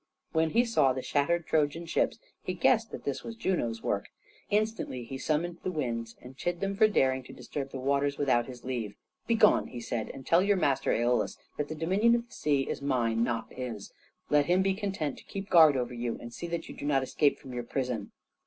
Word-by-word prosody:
When 160 0 +2
he 235 +8 +3
saw 140 - +3
the 130 0 -4
shattered 165 +4 +1
Trojan 155 +2 +1
ships 165 - 0 0.2
he - - -3
guessed - - +3
that - - -8
this - - -3
was 230 - -6
Juno's 120 - -1
work. 100 - -1 0.4
Instantly 210 - -1
he 130 +3 -7
summoned 170 +4 -1
the 185 - -2
winds 115 -7 -3
and 125 +1 -11
chid 175 +5 -2
them 195 +1 -1
for 215 +1 +6
daring 130 -10 +2
to - - -11
disturb 140 -2 -5
the 135 - -6
waters 140 +2 +1
without 125 -4 +2
his 125 -2 -10
leave. 120 -5 -3 0.3
"Begone," 225 -2 +4
he 125 - -7
said, 115 -1 -3
"and 135 - -9
tell 170 +2 +5
your 200 +1 +3
master 140 -6 +1
Æolus 120 +1 +1 0.2
that 150 - -1
the 155 - -5
dominion 195 +9 +3
of 235 0 -2
the - - -19
sea 140 -3 +1
is - - -3
mine, 120 -5 +1
not 120 -2 -2
his. 120 -5 -6 0.4
Let 145 -1 +4
him 185 +2 +4
be 195 0 +2
content 190 -8 -3
to - - -15
keep 195 0 -7
guard 160 -5 +7
over 125 -1 -2
you 120 -1 -3
and 120 0 -9
see 170 - -5
that 170 0 -4
you - - -9
do - - -7
not 135 -2 +2
escape 145 +2 +2
from 130 - -10
your 120 - -2
prison." 125 -4 -3
140 Hz, 220 wpm, -29 LUFS, 125-175 Hz, 0.4 s, guard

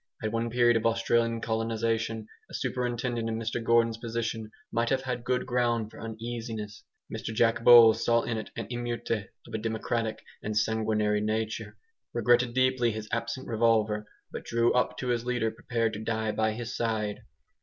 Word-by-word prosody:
At 110 - -1
one 115 +1 -1
period 120 0 +4
of 115 - -3
Australian 115 0 +1
colonisation 115 0 -1 0.2
a - - -7
superintendent 120 -2 -2
in 110 - -2
Mr 115 +1 -3
Gordon's 115 -1 +3
position 115 -1 -3 0.2
might 115 0 +1
have 135 0 +1
had 125 -2 -3
good 125 0 0
ground 120 -3 0
for 110 - -11
uneasiness. 115 -2 -6 0.3
Mr - - -5
Jack 115 +1 +2
Bowles 115 -2 +8
saw 115 -1 +3
in 115 - -2
it 110 - -5
an - - -4
EMEUTE 120 -4 -2 0.2
of - - -13
a 110 - -1
democratic 110 0 -2 0.2
and 105 0 -2
sanguinary 105 -1 +1
nature, 110 +1 -2 0.4
regretted 120 +1 +3
deeply 130 -2 +3
his 110 -1 -5
absent 115 +3 -3
revolver, 110 -2 +2 0.2
but - - -6
drew 115 0 +2
up 125 0 +1
to 125 - -3
his 120 -1 +1
leader 120 -2 0
prepared 115 -1 -1
to 105 - -4
die 110 -1 -1
by 110 0 +1
his 120 +2 -5
side. 110 -3 -1
115 Hz, 170 wpm, -28 LUFS, 110-120 Hz, 0.4 s, Bowles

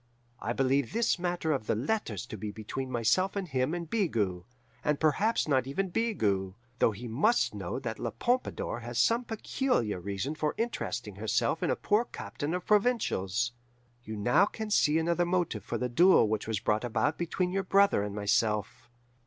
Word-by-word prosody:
I 115 - -3
believe 135 +5 +1
this 230 -4 +1
matter 175 -2 -1
of 135 -7 -1
the - - +2
letters 120 - -2
to 115 - -7
be 105 +1 -5
between 110 +5 -5
myself 125 - +1
and 195 -2 -2
him 135 +2 0
and 170 -1 -5
Bigot 110 - -1 0.4
and 150 -1 +1
perhaps 190 +9 +2
not 130 -3 +2
even 185 +8 -1
Bigot, 100 - 0 0.2
though - - +4
he 115 +4 -7
must 150 - +2
know 95 -1 -4
that 120 -4 -5
La 115 - -2
Pompadour 180 - -1
has 120 0 -6
some 235 +2 +3
peculiar 225 - -1
reason 100 - -3
for 155 -1 -2
interesting 235 +1 -3
herself - - 0
in - - 0
a - - +2
poor 215 +3 +1
captain 155 -5 -4
of 180 - -4
provincials. 120 - +1 0.5
You 110 -1 -6
now 120 - +3
can 220 0 -6
see 155 -6 +4
another 170 +2 +1
motive 175 -1 -1
for - - -3
the 125 - -1
duel 165 - +5
which 110 0 -2
was 110 -3 -1
brought 105 +2 0
about 120 +5 0
between 180 +1 -1
your 195 +1 0
brother 195 - +4
and 105 0 -4
myself. 105 +3 0
135 Hz, 180 wpm, -30 LUFS, -, 0.5 s, duel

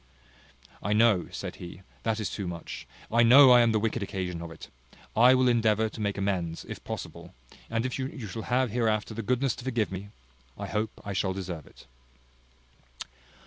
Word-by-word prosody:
"I 105 - 0
know," 105 -5 +4
said - - -6
he, 90 +1 -10 0.2
"that 110 -1 -1
is 110 - -3
too 100 -3 -4
much. 85 -6 -7 0.2
I 115 +1 +4
know 130 +3 +8
I 125 -1 +8
am 115 -1 +4
the 110 - +2
wicked 115 +1 -1
occasion 90 -4 -4
of 85 - -6
it. 80 - -11 0.5
I 125 +3 +7
will 130 0 +3
endeavour 110 -2 +3
to 110 - -8
make 100 -1 -1
amends, 90 -4 -2
if - - -8
possible; - - -7 0.3
and 115 +1 -1
if 130 +1 -3
you 130 -3 -5
shall 110 +4 -5
have 125 -1 +2
hereafter 110 -2 0
the 115 - -4
goodness 125 +2 0
to - - -8
forgive 120 -5 -1
me, 95 +2 -6 0.5
I 100 - -5
hope 105 +2 -1 0.2
I 100 - -3
shall 95 0 0
deserve 90 -5 -6
it." - - -17
110 Hz, 185 wpm, -28 LUFS, 95-120 Hz, 0.5 s, know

